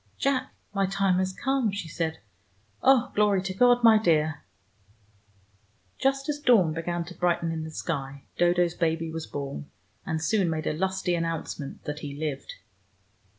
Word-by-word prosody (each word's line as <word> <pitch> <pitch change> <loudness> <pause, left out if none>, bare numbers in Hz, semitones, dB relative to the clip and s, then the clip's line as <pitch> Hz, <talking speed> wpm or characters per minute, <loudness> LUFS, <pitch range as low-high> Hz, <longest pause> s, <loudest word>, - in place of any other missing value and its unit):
"Jack, 275 -2 0 0.2
my 195 -1 +1
time 195 -1 +2
has 185 0 0
come," 265 +1 0
she 200 -4 -5
said. 160 0 -2 0.6
"Oh, 265 -3 +4
glory 205 -3 +3
to 190 0 -3
God, 245 +4 +4
my 225 -2 +7
dear!" 155 -5 +2 1.6
Just 270 +1 +1
as 295 -1 -1
dawn 225 - +4
began 170 +1 -2
to 175 - -9
brighten 170 -1 +1
in 160 -1 -3
the 160 - -6
sky, 140 -3 -4
Dodo's 175 0 +3
baby 165 -1 -1
was 160 0 -5
born, 135 - -6 0.3
and 160 -4 -2
soon 185 +2 +1
made 160 -1 -2
a - - 0
lusty 190 +2 -1
announcement 165 -4 -3
that 150 0 -4
he 145 -2 -6
lived. 145 -2 -4
175 Hz, 155 wpm, -27 LUFS, 160-200 Hz, 1.6 s, my